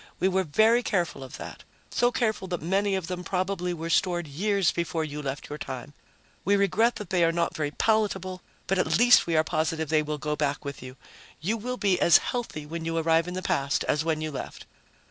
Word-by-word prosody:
We 185 - +3
were 190 0 +1
very 220 +10 +4
careful 175 - -1
of 130 - -9
that, - - -9 0.3
so 245 0 +2
careful 220 -6 -1
that 175 -2 -3
many 195 +3 +1
of 190 -3 -2
them 180 +1 -5
probably 180 0 -1
were 165 -1 -4
stored 175 -2 +1
years 195 +5 +1
before 170 -1 -2
you 150 -1 -5
left 140 0 -5
your 150 +1 -7
time. 130 +2 -6 0.5
We 200 +3 +3
regret 220 +4 +2
that 210 -5 -8
they 180 -2 +3
are 165 - +4
not 170 0 -1
very 150 -2 -1
palatable, 190 -1 0 0.2
but 195 0 0
at - - +2
least 245 -4 +6
we 165 -2 +1
are 155 - +5
positive 160 -1 -1
they 155 -1 +3
will 150 0 -3
go 150 +1 -2
back 145 -1 -2
with 140 0 -6
you. 130 +1 -10 0.4
You 200 +8 -1
will 250 +3 -4
be 195 -5 +2
as 170 - +7
healthy 230 -11 -4
when 165 +2 -5
you 165 0 -2
arrive 165 +1 +2
in 180 - -5
the 185 - -4
past 140 -3 0
as 150 - 0
when 160 -1 -1
you 155 0 -3
left. 135 - -7
170 Hz, 220 wpm, -27 LUFS, 155-195 Hz, 0.5 s, as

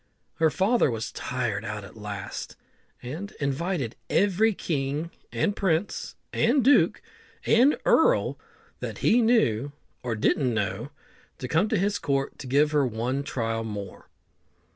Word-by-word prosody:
Her 160 -1 +4
father 195 - +2
was 115 -1 -3
tired 125 -4 -3
out 105 -1 -5
at 100 - -12
last, 105 -1 -6 0.5
and 160 +12 -6
invited 140 -2 -2
every 205 +3 +3
king, 150 -3 -2 0.2
and 205 - 0
prince, 190 -1 -1 0.2
and 255 +3 +3
duke, 280 +4 +4 0.4
and 255 +6 +5
earl - - +3 0.4
that - - -5
he 240 - +5
knew 145 - +2 0.3
or 120 -2 -2
didn't 125 +3 +1
know 105 +4 -2 0.5
to 125 - -5
come 165 - +2
to 220 - +1
his 200 +2 0
court 135 -1 -1
to 135 - -7
give 145 +4 +3
her 150 -2 +3
one 125 +3 -1
trial 115 -4 -2
more. 100 -3 -7
140 Hz, 140 wpm, -26 LUFS, -, 0.5 s, and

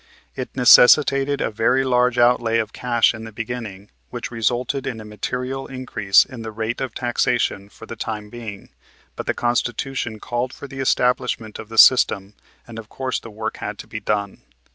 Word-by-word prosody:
It 130 - -5
necessitated 135 +2 +6
a - - -1
very 125 +5 +2
large 125 -1 +2
outlay 120 -1 +3
of 110 -2 -2
cash 120 -2 +2
in 110 -1 -8
the 110 - -8
beginning, 110 -3 -7 0.2
which - - -6
resulted 120 +3 -1
in 120 -4 -4
a 110 - -9
material 125 +5 -4
increase 125 -7 +2
in 125 -4 -10
the 110 - -6
rate 110 +3 -4
of 130 -4 -4
taxation 120 -4 -1
for 115 - -13
the 115 - -8
time 105 -1 -5
being, 110 -4 -9 0.5
but - - -7
the - - 0
Constitution 120 -1 -2
called 120 +3 -3
for 140 - -9
the 135 0 -9
establishment 125 -4 0
of 110 - -9
the 110 - -8
system, 105 -5 +5 0.3
and 115 -1 -8
of 110 -1 -11
course 130 -1 -3
the 115 - -11
work 110 +1 -5
had 105 0 -5
to - - -9
be 110 - -6
done. 105 -1 -2
120 Hz, 185 wpm, -21 LUFS, 110-125 Hz, 0.5 s, necessitated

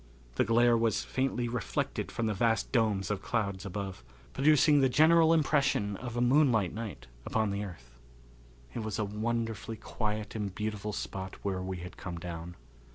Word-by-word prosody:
The - - +2
glare 120 +1 +4
was 115 -2 +1
faintly 130 -2 -1
reflected 120 -3 -2
from 115 - -2
the 110 - +1
vast 115 +2 +1
dome 110 -5 +2
of 100 -2 -2
clouds 100 -4 -2
above, 95 -6 -5 0.3
producing 150 0 +5
the 135 - +4
general 160 +4 +5
impression 140 -10 +2
of 120 +3 -6
a - - +1
moonlight 120 - +3
night 105 - -6 0.2
upon 110 - 0
the 100 +1 -2
earth. 70 -12 -10 0.8
It - - -4
was 110 -2 -3
a 110 - 0
wonderfully 115 +1 -3
quiet 105 -1 -3
and 100 -4 -4
beautiful 105 -1 -3
spot 95 -2 -5
where 95 -2 -1
we 95 0 -4
had 90 - -10
come 85 -1 -6
down. 85 0 -6
110 Hz, 165 wpm, -30 LUFS, 100-120 Hz, 0.8 s, producing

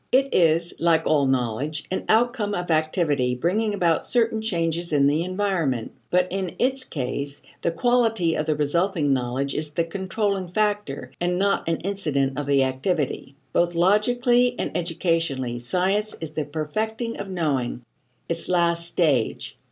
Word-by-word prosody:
It 270 +1 +3
is, 165 0 +3
like 165 -1 +3
all 145 -3 +3
knowledge, 130 +4 -1
an 185 - -2
outcome 225 -2 +2
of 175 -1 -3
activity 155 -5 +1
bringing 205 - 0
about 170 -4 +2
certain 225 -2 +1
changes 170 -5 -1
in 140 -2 +3
the 150 +4 +2
environment. 180 - -1 0.2
But 180 0 +2
in 190 -2 -3
its 260 +1 +1
case, 140 +1 -4 0.2
the - - +1
quality 225 -2 +2
of 155 - -2
the 155 - +2
resulting 150 0 +1
knowledge 130 +2 -1
is 155 0 -2
the 160 +3 0
controlling 195 +2 -2
factor 205 -9 -1
and 175 0 +1
not 200 -3 +1
an 165 - +1
incident 145 -8 -1
of 145 - -4
the 140 -1 +4
activity. 135 +1 -2 0.2
Both 175 0 +2
logically 240 +7 +3
and - - -3
educationally, 165 -8 -1
science 190 - 0
is 160 -2 -6
the 155 -1 -3
perfecting 220 - -3
of 200 - -5
knowing, 140 -9 -1 0.4
its 170 0 0
last 170 -1 +1
stage. 150 -9 0
170 Hz, 150 wpm, -24 LUFS, 145-200 Hz, 0.4 s, the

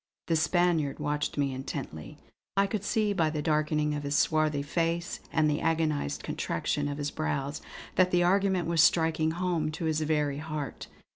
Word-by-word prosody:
The 165 - +1
Spaniard 160 -2 +2
watched 150 0 -2
me 140 -2 +1
intently; 130 - -6 0.4
I 195 - +5
could 200 0 -3
see 210 -1 +1
by 165 -5 +2
the 150 -1 -3
darkening 150 -1 +1
of 145 - -2
his 145 0 -2
swarthy 155 -2 +2
face 170 +3 -1
and 155 -2 +3
the 150 0 0
agonised 160 - 0
contraction 145 -1 -2
of 145 0 -3
his 145 0 -2
brows 135 - -2 0.4
that 185 -1 +5
the 175 -1 +3
argument 190 -1 +2
was 165 -2 +3
striking 160 -1 +3
home 170 -2 -1
to 165 - -4
his 155 -1 0
very 150 -2 0
heart. 155 -2 -5
155 Hz, 170 wpm, -29 LUFS, 145-170 Hz, 0.4 s, I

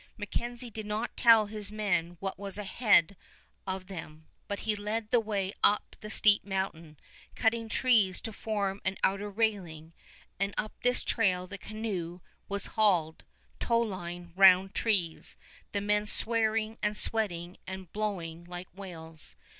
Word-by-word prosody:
MacKenzie 240 +3 -4
did 215 -1 -6
not 215 +3 -3
tell 225 -3 +6
his 210 -1 -4
men 175 -5 -1
what 195 -1 -4
was 200 -1 -5
ahead 205 -2 +3 0.5
of 190 0 -3
them, 160 -4 -9 0.2
but 200 - -4
he 215 -1 0
led 210 +2 -3
the 245 - +5
way 200 -3 -2
up 210 - +5
the 215 - -8
steep 210 -1 +5
mountain, 190 -6 -4 0.4
cutting 225 -1 +1
trees 220 -7 +3
to 225 - -6
form 200 -2 -2
an 190 - -1
outer 200 +2 +1
railing, 190 -7 -2 0.5
and 195 0 -1
up 215 - -2
this 245 0 +2
trail 185 -5 +1
the 200 +2 -8
canoe 190 -6 -4 0.3
was 200 -1 -2
hauled, 180 -8 +2 0.4
towline 175 -7 -2
round 190 0 +7
trees, 185 -8 0 0.3
the 200 - -1
men 210 +1 +1
swearing 220 0 +1
and 210 0 0
sweating 180 -6 +1
and 190 -2 -7
blowing 175 -6 -3
like 175 +1 -8
whales. 165 - -6
200 Hz, 145 wpm, -30 LUFS, 180-215 Hz, 0.5 s, round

